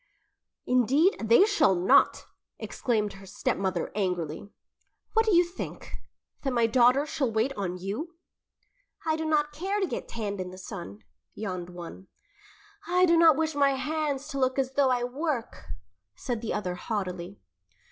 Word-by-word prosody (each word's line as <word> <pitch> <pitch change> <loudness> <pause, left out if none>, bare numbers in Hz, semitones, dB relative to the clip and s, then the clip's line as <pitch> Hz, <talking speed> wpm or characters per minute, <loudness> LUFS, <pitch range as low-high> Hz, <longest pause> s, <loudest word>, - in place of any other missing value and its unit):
"Indeed, 260 - +3
they 230 - +6
shall 325 - +3
not!" 190 +11 +4 0.3
exclaimed 215 -5 -1
her 195 0 -13
stepmother 185 -2 -2
angrily. 180 -3 -2 0.6
"What 445 0 +3
do 415 - +4
you 350 - +7
think 345 +1 -8 0.5
that 270 - -1
my 235 -1 +3
daughters 250 +5 +4
shall 280 -5 -1
wait 225 +5 0
on 185 -6 -3
you?" 215 - -5 0.9
"I 315 -1 +2
do 320 0 -3
not 300 -1 +1
care 380 +7 -2
to 390 - +1
get - - -5
tanned 205 -4 -4
in 180 - -5
the 185 - -11
sun," 175 - -8 0.3
yawned 185 -4 -5
one. 175 +2 -10 0.8
"I 360 +1 +4
do 340 -1 +4
not 330 -3 +6
wish 320 0 0
my 280 -1 +3
hands 295 0 -2
to 275 - -4
look 260 0 +1
as 265 -1 0
though 275 -1 +3
I 250 -1 +1
work," 260 -1 -3 0.5
said 240 -4 -4
the 230 - -3
other 185 -4 -2
haughtily. 185 -1 -4
250 Hz, 155 wpm, -27 LUFS, 195-305 Hz, 0.9 s, you